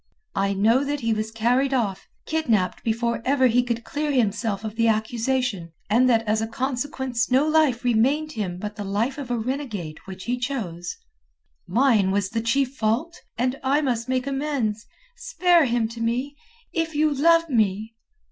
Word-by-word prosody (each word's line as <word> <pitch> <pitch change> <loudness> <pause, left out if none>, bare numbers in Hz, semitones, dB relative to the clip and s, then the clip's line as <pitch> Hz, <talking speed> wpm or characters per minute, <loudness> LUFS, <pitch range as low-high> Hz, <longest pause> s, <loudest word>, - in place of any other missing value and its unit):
I 195 0 0
know 225 +7 +3
that 285 0 -2
he 230 -1 +1
was 215 0 -2
carried 245 +5 +1
off, 205 -7 -2 0.2
kidnapped 230 - 0
before 235 +1 -1
ever 260 0 +3
he 245 0 +4
could 235 -1 -3
clear 295 +3 -2
himself 220 -4 0
of 215 -1 -5
the 230 0 +2
accusation, 225 -4 -1 0.2
and 250 +4 +4
that 225 -2 +3
as 215 +1 +1
a 225 - -1
consequence 255 0 -2
no 265 +4 +3
life 305 -6 +3
remained 265 +6 +2
him 195 - -4
but 210 +2 -6
the 205 - -4
life 220 +8 -1
of 270 -4 -6
a 245 - 0
renegade 220 - -4
which 190 -1 -8
he 245 +1 -2
chose. 200 - -4 0.7
Mine 230 -6 +3
was 195 0 0
the 225 - -1
chief 265 +3 0
fault. 255 +10 -1 0.2
And 255 +3 0
I 275 +3 +2
must 245 -4 -1
make 255 0 0
amends. 270 -6 -2 0.3
Spare 365 -9 +3
him 235 -2 +1
to 230 0 -8
me! 250 +5 -1 0.4
If 330 -3 -1
you 305 0 +2
love 330 +4 +4
me...." 220 -4 0
240 Hz, 175 wpm, -24 LUFS, 220-275 Hz, 0.7 s, he